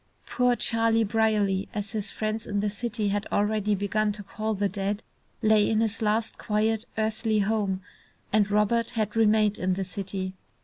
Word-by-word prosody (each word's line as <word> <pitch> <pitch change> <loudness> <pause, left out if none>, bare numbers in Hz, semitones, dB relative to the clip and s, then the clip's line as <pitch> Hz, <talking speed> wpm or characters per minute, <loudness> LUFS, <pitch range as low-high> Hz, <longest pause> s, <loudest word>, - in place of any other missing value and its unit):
"Poor 250 -1 +2
Charlie 230 -1 +2
Brierly," 210 -3 +1
as 205 -1 -3
his 210 -2 -3
friends 215 +1 -3
in 205 -1 -1
the 205 0 0
city 215 -1 -2
had 205 0 -1
already 210 0 +1
begun 210 +2 0
to 205 0 -8
call 215 +2 -3
the 200 +1 +1
dead, 200 +1 -3 0.4
lay 215 -1 +4
in 220 - +2
his 225 0 0
last, 220 +1 0
quiet 220 +1 0
earthly 220 0 0
home, 200 -2 0 0.5
and 210 -1 +3
Robert 210 +3 +2
had 215 -2 -2
remained 215 -1 +3
in 185 0 +1
the 195 - -2
city. 190 0 -4
210 Hz, 170 wpm, -27 LUFS, 200-220 Hz, 0.5 s, lay